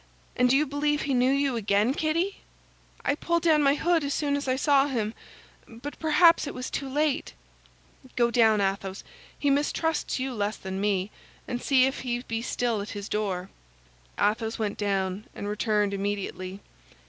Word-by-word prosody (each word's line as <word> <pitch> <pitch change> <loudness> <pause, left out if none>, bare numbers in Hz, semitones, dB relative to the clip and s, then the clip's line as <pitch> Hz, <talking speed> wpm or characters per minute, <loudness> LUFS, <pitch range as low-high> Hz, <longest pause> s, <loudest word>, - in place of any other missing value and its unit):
And 250 0 +3
do 265 - +5
you 300 - +2
believe 295 +1 0
he 280 - -1
knew 250 0 +3
you 275 -1 +1
again, 210 +2 +2
Kitty?" 335 +6 -1 0.7
"I - - +3
pulled 340 +3 -1
down 315 -3 +4
my 280 0 +4
hood 335 +1 +2
as 280 0 -1
soon 285 -2 0
as 285 -1 -3
I 255 - +2
saw 280 0 +3
him, 225 -6 -2 0.5
but 245 +6 -9
perhaps 320 0 +5
it - - -6
was 255 - -5
too 275 - -3
late." 295 +1 0 0.8
"Go 235 -1 +2
down, 220 -3 +4
Athos—he 195 +8 -3
mistrusts 300 +3 0
you 260 0 -3
less 210 -1 -2
than 190 0 -5
me—and 205 +4 -3
see 260 -2 +4
if 265 - -2
he 245 -1 -3
be 225 -2 -3
still 235 -2 -1
at 205 - -6
his 200 0 -5
door." 195 -3 -2 0.7
Athos 220 +2 +1
went 210 -2 -3
down 195 -1 -1
and 205 - -5
returned 210 -1 0
immediately. 195 -1 -4
245 Hz, 170 wpm, -27 LUFS, 205-285 Hz, 0.8 s, do